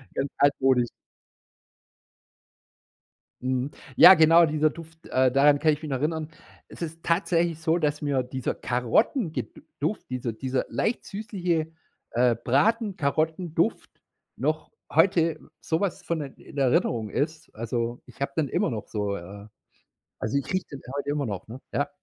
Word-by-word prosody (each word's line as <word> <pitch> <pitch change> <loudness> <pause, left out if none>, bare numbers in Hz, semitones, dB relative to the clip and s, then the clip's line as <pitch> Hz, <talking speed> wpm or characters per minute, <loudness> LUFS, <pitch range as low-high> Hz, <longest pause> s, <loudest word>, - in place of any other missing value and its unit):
Ganz 135 +1 -1
altmodisch. 135 -3 +3 2.5
Mhm. 130 +1 -1 0.3
Ja, 185 +2 +11
genau, 165 +1 +6
dieser 155 0 +2
Duft, 165 0 -13
äh, 130 0 +3
daran 145 +2 +5
kann 155 0 +3
ich 150 - -4
mich 155 - -5
noch 130 - 0
erinnern. 155 +2 -1 0.4
Es - - -10
ist 165 0 -6
tatsächlich 170 -2 +1
so, 160 +2 +2
dass 150 -2 0
mir 140 -3 +1
dieser 130 0 -3
Karotten 155 - +1
ge - - -3 0.3
Duft, 215 - -2
dieser 125 -2 -2
dieser 130 +3 -2
leicht 225 - -1
süßliche, 180 -6 -2 0.4
äh, 120 0 +3
Braten-Karotten-Duft 165 - +1 0.5
noch - - -1 0.2
heute 165 -4 +3 0.2
so 160 0 -1
was 200 -3 -2
von 170 -2 -2
in 140 0 -11
Erinnerung 120 -4 +1
ist. 155 +5 -3
Also 115 +1 -3
ich - - -17
habe 140 0 -1
dann 155 -3 +1
immer - - 0
noch 110 -4 -5
so 105 -2 -2
äh, 100 +3 -10 0.8
also 110 +6 0
ich 140 - -1
rieche 185 -1 0
den 140 - -8 0.2
heute 145 - -3
immer 145 -2 -1
noch, 100 -3 -5
ne? 125 +4 -9
Ja. 145 - 0
145 Hz, 150 wpm, -26 LUFS, 130-165 Hz, 2.5 s, Ja